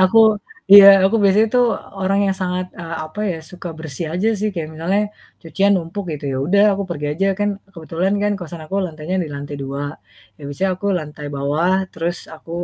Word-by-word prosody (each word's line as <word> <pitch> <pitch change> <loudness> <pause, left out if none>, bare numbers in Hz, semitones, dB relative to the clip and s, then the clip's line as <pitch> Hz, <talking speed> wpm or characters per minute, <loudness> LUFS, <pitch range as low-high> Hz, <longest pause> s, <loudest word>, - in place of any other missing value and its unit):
aku 190 +4 +5 0.5
iya. 200 -1 +12 0.2
Aku 195 +4 +3
biasanya 200 +2 +4
itu 250 - +3 0.4
orang 195 +1 +1
yang 195 - +1
sangat, 180 0 -2
eee, 165 -1 -6
apa 155 +7 -8
ya, 175 - -3
suka 180 0 -8
bersih 160 +1 -5
aja 195 +5 +1
sih 215 +2 0
kayak 165 -3 -4
misalnya 175 +6 0 0.4
cucian 195 +5 +1
numpuk 185 +3 -4
gitu, 150 -1 -7
ya - - -2
udah 200 +4 +4
aku 200 - -3
pergi 150 -3 -3
aja 195 +6 0
kan 205 0 +1 0.3
kebetulan 170 +3 -2
kan 205 0 +1
kosan 170 -2 -8
aku 190 - -7
lantainya 160 +2 -5
di 160 - -5
lantai 145 +1 -6
2, 135 +1 -4 0.6
ya - - -22
biasanya 165 +7 -1
aku 200 - -4
lantai 150 -2 -8
bawah 145 +6 0 0.2
terus 170 +2 -2 0.2
aku, 160 - -15
175 Hz, 195 wpm, -19 LUFS, 155-195 Hz, 0.6 s, iya